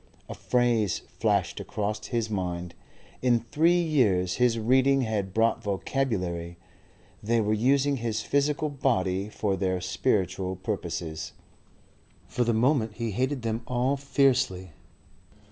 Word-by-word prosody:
A - - -6
phrase 120 -6 +1 0.2
flashed - - +1
across 105 +1 -3
his 115 -3 -1
mind 90 -4 -3 0.5
in 120 -2 +3
three 170 +3 +4
years 105 - +2
his 125 -2 +3
reading 130 +4 +3
had 105 -5 -2
brought 115 +2 +1
vocabulary 90 -6 -2 0.6
they 115 +2 +1
were 105 -1 +1
using 135 +5 +2
his 115 -2 -2
physical 145 +1 0
body 100 -9 0
for 105 -2 -1
their 95 -1 -1
spiritual 95 -1 -1
purposes. 85 -5 -4 0.9
For 125 - 0
the 120 - +1
moment 115 -1 +1
he 115 -1 -3
hated 130 +4 -1
them 115 0 -2
all 125 +2 +1
fiercely. 135 - +1
110 Hz, 125 wpm, -27 LUFS, 95-130 Hz, 0.9 s, three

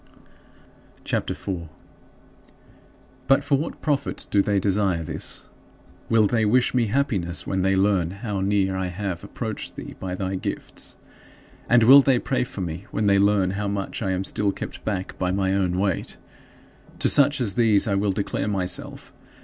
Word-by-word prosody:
CHAPTER - - -1
IV - - -12
5. 95 -2 -1 1.7
But 135 +1 +4
for 140 0 +2
what 160 - -6
profit 140 -2 -1
do 100 - +4
they 100 0 +1
desire 95 -3 +1
this? - - -3 0.6
Will 115 -2 +4
they 110 +2 +1
wish 120 +4 +3
me 120 -3 +2
happiness 100 -8 -1
when 95 -1 -1
they 95 +1 +2
learn 95 -3 +2
how 100 0 -4
near 95 -1 +1
I 95 -1 -1
have 90 -1 -4
approached - - -6
thee, - - -8
by 90 -1 -4
thy 95 0 -3
gifts? - - -4 0.7
And 120 -1 +5
will 135 +5 +9
they 135 -2 +3
pray 130 +1 0
for 100 - -7
me 85 +2 -5
when 105 - -1
they 100 -1 +4
learn 100 -2 +3
how 100 +1 -3
much 100 +1 -3
I 100 - -1
am 95 0 -1
still 100 +1 0
kept - - -8
back 95 -3 -4
by 90 - 0
my 95 0 0
own 90 -2 0
weight? 95 -2 -1 0.8
To - - +1
such 145 0 +4
as 110 -6 0
these 110 -2 +3
I 100 - +1
will 100 +1 +1
declare 100 0 -2
myself. 95 -3 -3
100 Hz, 175 wpm, -24 LUFS, 95-110 Hz, 1.7 s, will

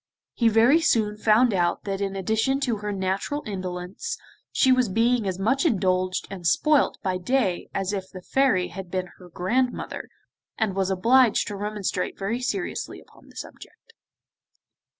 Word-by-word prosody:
He 230 - +2
very 235 +9 +5
soon 215 -8 +2
found 220 +2 +3
out 175 -2 0
that 195 -1 -3
in 195 -1 -2
addition 220 +8 0
to 240 -5 0
her 210 0 -4
natural 195 +9 -2
indolence, 185 - -5 0.3
she 260 - +3
was 255 -3 +3
being 230 +2 +2
as 185 -1 -2
much 260 +8 +1
indulged 185 - +1
and 180 -3 -3
spoilt 300 - +3
day - - -58
by 185 -1 0
day 195 -2 0
as 195 +1 -2
if 190 -2 -4
the 185 -2 -10
Fairy 255 -9 +2
had 190 -2 -8
been 185 0 -3
her 180 -1 -13
grandmother, 240 +9 -2 0.5
and 215 -4 0
was 195 -1 0
obliged 230 +5 +4
to 205 - -5
remonstrate 205 -2 -3
very 210 +5 -2
seriously 355 +9 -3
upon - - -20
the - - -19
subject. 460 - -11
205 Hz, 165 wpm, -25 LUFS, 185-245 Hz, 0.5 s, very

